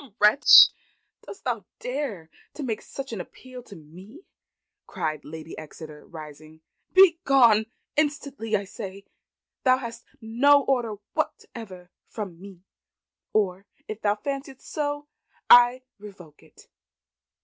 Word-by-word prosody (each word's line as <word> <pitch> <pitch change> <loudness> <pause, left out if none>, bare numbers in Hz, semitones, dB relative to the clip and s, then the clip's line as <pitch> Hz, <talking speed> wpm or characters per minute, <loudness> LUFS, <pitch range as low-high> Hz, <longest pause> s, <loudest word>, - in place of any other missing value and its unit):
"Wretch! 210 +8 +8 0.6
dost 400 - -11
thou 235 -5 -2 0.2
dare 245 - -5 0.2
to 295 - -6
make 225 -5 -3
such 270 -3 -8
an 205 - -4
appeal 255 +7 -12
to 225 -4 -14
me?" 185 - -14 0.7
cried 155 -5 -4
Lady 160 +1 -9
Exeter 155 -1 -11
rising. 155 0 -12 0.3
"Begone, 275 - +5 0.3
instantly, 285 -7 -1
I 200 - -1
say. 195 -1 -9 0.6
Thou 255 -1 +4
hast 235 -3 -8 0.2
no 270 +5 +3
order 240 -6 -1 0.2
whatever 185 -6 -6 0.2
from 190 -6 -8
me; 190 -3 -13 0.7
or 195 -2 -1 0.2
if 215 0 -7
thou 205 0 +1
fanciest 275 +2 -6
so, 290 -1 -3 0.4
I 245 +1 +7 0.2
revoke 190 -7 -14
it." - - -20
220 Hz, 115 wpm, -25 LUFS, 180-265 Hz, 0.7 s, Wretch